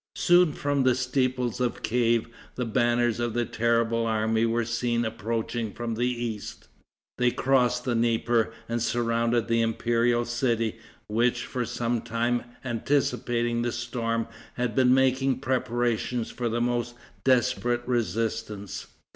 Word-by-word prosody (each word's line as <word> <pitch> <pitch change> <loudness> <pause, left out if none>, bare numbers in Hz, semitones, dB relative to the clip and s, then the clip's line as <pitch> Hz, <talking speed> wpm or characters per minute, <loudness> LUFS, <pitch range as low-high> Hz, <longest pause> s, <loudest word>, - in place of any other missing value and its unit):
Soon 175 -3 +4
from 145 -1 0
the 130 -1 +4
steeples 125 -1 0
of 125 -1 -1
Kief 115 0 +2 0.3
the 125 - -2
banners 120 0 +1
of 120 -1 -1
the 120 0 +1
terrible 115 0 +1
army 110 +1 +1
were 115 0 0
seen 120 0 0
approaching 110 0 -3
from 120 -1 -3
the 120 +2 0
east. 120 -4 -4 0.5
They 125 0 +4
crossed 125 -1 +2
the 125 - +1
Dnieper 115 0 +1 0.2
and 115 0 -2
surrounded 115 0 +1
the 115 0 +2
imperial 120 +1 +1
city, 115 -2 0 0.3
which, 120 +3 +1
for 125 -1 -3
some 120 -1 -1
time 120 +1 -1 0.2
anticipating 120 -1 0
the 120 0 0
storm, 115 -1 -2 0.3
had 125 -2 -1
been 125 +1 +4
making 130 0 +3
preparation 120 -2 0
for 120 +1 -3
the 120 +1 -1
most 120 0 -1 0.3
desperate 125 -1 +2
resistance. 110 -2 -2
120 Hz, 135 wpm, -27 LUFS, 115-125 Hz, 0.5 s, Soon